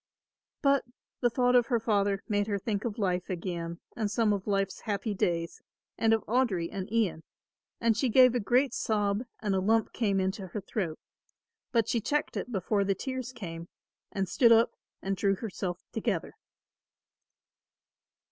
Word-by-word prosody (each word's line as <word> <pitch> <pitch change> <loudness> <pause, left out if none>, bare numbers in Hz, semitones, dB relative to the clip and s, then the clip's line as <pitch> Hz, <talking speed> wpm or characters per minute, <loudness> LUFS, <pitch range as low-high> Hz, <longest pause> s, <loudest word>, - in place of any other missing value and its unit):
But 275 -1 +4 0.4
the 240 - +3
thought 245 +1 +2
of 245 -1 +5
her 240 -3 +2
father 200 -3 +1
made 205 -2 +1
her 205 -2 0
think 205 +1 -2
of 230 -1 -3
life 185 -4 -1
again 170 -2 -4 0.2
and 215 -3 -1
some 210 0 +2
of 200 0 -4
life's 195 -2 0
happy 205 +1 -2
days 170 -3 -1 0.3
and 225 - +2
of 225 -1 +2
Audry 215 -8 +1
and 195 0 -5
Ian, 215 -8 +1 0.6
and 230 -1 +3
she 250 +3 +1
gave 255 +1 +7
a 245 - +1
great 250 +5 +2
sob 205 -1 0 0.2
and 205 -2 0
a 190 - +2
lump 220 +4 +2
came 200 -4 +1
into 190 +1 -2
her 185 - -4
throat; 185 -5 -3 0.7
but 230 -2 +2
she 230 - +1
checked 295 +7 -1
it - - -4
before 200 0 +1
the 195 0 +1
tears 260 +2 -4
came 170 -8 -7 0.4
and 195 -1 -1
stood 230 +6 +4
up 230 0 +6 0.3
and 195 0 0
drew 195 +1 +2
herself 185 -4 -4
together. 210 -7 -2
205 Hz, 165 wpm, -29 LUFS, 190-230 Hz, 0.7 s, gave